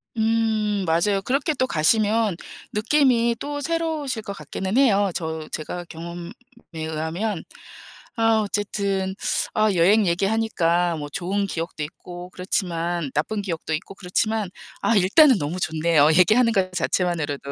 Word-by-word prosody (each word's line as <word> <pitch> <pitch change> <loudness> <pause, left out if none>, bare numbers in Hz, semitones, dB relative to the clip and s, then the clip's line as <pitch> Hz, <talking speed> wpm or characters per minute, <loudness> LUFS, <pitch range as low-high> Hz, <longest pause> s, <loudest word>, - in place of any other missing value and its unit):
음 220 -2 +1
맞아요. 195 +5 +2
그렇게 280 +5 0
또 255 -2 0
가시면 210 +3 +2 0.4
느낌이 235 0 +2
또 290 +2 -4
새로우실 315 -6 -2
것 200 - -5
같기는 190 +1 -4
해요, 205 -8 +4
저 160 -2 -4
제가 175 +3 -5
경험에 170 +3 -8 0.4
의하면. 160 +5 -3 0.8
아 225 -1 +3
어쨌든 200 -2 -2 0.4
아 215 -1 +3
여행 200 +5 +4
얘기하니까 175 -3 +1
뭐 145 - -5
좋은 195 +6 -2
기억도 165 -3 -4
있고 175 +3 -9
그렇지만 175 -4 -2
나쁜 205 +8 -1
기억도 165 -4 -4
있고 170 +5 -7
그렇지만 205 +2 -1 0.3
아 230 - +2
일단은 225 - +6
너무 165 +5 -3
좋네요, 160 -2 +3
얘기하는 230 +6 +5
것 185 -2 +1
자체만으로도. 160 -6 -1
195 Hz, 305 characters per minute, -23 LUFS, 170-220 Hz, 0.8 s, 일단은